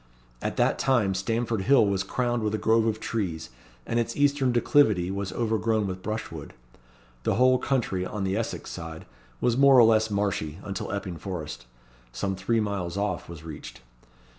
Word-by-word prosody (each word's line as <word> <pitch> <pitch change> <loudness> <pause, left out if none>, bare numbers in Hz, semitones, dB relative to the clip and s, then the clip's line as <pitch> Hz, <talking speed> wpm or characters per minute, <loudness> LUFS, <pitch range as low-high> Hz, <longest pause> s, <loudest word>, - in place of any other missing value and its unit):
At - - -3
that - - +2
time 120 -7 +2
Stamford 115 +3 -1
Hill 130 +2 +5
was 100 -2 0
crowned 120 +4 -1
with 105 0 0
a - - -1
grove 110 +1 +3
of 110 -1 -1
trees, 85 - -3 0.3
and 115 - 0
its 115 0 -2
eastern 145 -2 +3
declivity 110 -7 +3
was 100 0 -3
overgrown 110 -2 0
with 95 -1 -4
brushwood. 95 -8 -5 0.7
The - - 0
whole 130 +2 +4
country, 115 -9 0
on 100 +2 -4
the 95 0 0
Essex 115 +1 -3
side, 80 -1 -7 0.3
was 120 - +2
more 135 -1 +7
or 120 - +9
less 110 -1 +4
marshy, 100 -7 -1
until 100 -2 -4
Epping 95 -4 -4
Forest, 75 -9 -6 0.4
some 95 +10 -2
three 105 +5 0
miles 100 -4 -2
off, 105 -3 -2
was 85 -2 -9
reached. 80 -5 -9
105 Hz, 170 wpm, -26 LUFS, 95-115 Hz, 0.7 s, or